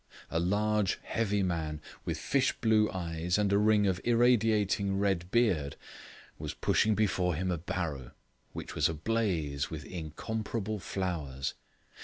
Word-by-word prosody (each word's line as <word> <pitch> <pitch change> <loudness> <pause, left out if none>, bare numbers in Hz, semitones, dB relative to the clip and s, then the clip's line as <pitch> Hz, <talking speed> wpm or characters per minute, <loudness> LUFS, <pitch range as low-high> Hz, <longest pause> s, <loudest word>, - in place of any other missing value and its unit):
A 80 - +1
large, 105 +3 +1
heavy 105 -3 0
man, 80 -4 -2 0.3
with - - -2
fish 135 -1 +1
blue 110 -2 +4
eyes 85 0 -1
and 100 -1 +2
a 100 - +5
ring 105 -1 +4
of 95 -1 0
irradiating 110 -5 +3
red 95 -3 0
beard, 95 -12 +2 0.6
was - - -5
pushing 110 -1 +2
before 95 -5 +1
him 90 +3 -1
a 85 - -1
barrow, 75 -7 -3 0.4
which - - -7
was - - +2
ablaze 80 -5 -1
with 80 -1 -6
incomparable 105 +6 -4
flowers. 80 -8 -3
95 Hz, 135 wpm, -31 LUFS, 80-105 Hz, 0.6 s, a